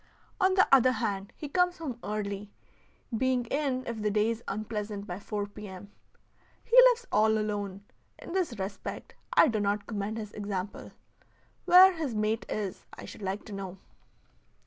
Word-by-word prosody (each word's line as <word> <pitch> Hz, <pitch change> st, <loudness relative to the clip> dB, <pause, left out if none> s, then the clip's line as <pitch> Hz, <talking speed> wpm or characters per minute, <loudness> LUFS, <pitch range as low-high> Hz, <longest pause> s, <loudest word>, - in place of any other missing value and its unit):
On 375 Hz, -1 st, +3 dB
the 375 Hz, -, +5 dB
other 255 Hz, -1 st, +6 dB
hand, 205 Hz, -4 st, -3 dB
he 300 Hz, -, -6 dB
comes 360 Hz, +4 st, +1 dB
home 270 Hz, -8 st, -5 dB
early, 205 Hz, -1 st, -4 dB, 0.7 s
being 255 Hz, +1 st, +1 dB
in 275 Hz, -3 st, 0 dB
if 230 Hz, -2 st, -4 dB
the 210 Hz, -, +1 dB
day 210 Hz, +2 st, +2 dB
is 230 Hz, 0 st, -5 dB
unpleasant 210 Hz, 0 st, -4 dB
by 180 Hz, -2 st, -6 dB
four 205 Hz, 0 st, -3 dB
P. 205 Hz, +1 st, -10 dB
M. 190 Hz, +1 st, -10 dB, 0.7 s
He 470 Hz, -, -1 dB
lives 485 Hz, 0 st, -1 dB
all 220 Hz, +1 st, +4 dB
alone; 205 Hz, -2 st, -3 dB, 0.3 s
in -, -, -10 dB
this 350 Hz, -, -1 dB
respect 195 Hz, +1 st, -6 dB, 0.2 s
I -, -, +7 dB
do 225 Hz, -5 st, 0 dB
not 205 Hz, 0 st, 0 dB
commend 210 Hz, 0 st, -3 dB
his 210 Hz, -2 st, -6 dB
example. 200 Hz, -1 st, -5 dB, 0.7 s
Where 370 Hz, +1 st, +8 dB
his 310 Hz, -9 st, -3 dB
mate 215 Hz, +1 st, -1 dB
is 200 Hz, -3 st, -4 dB
I -, -, -9 dB
should -, -, -11 dB
like 195 Hz, +1 st, -3 dB
to 210 Hz, -, -9 dB
know. 195 Hz, -1 st, -6 dB
215 Hz, 170 wpm, -29 LUFS, 200-255 Hz, 0.7 s, Where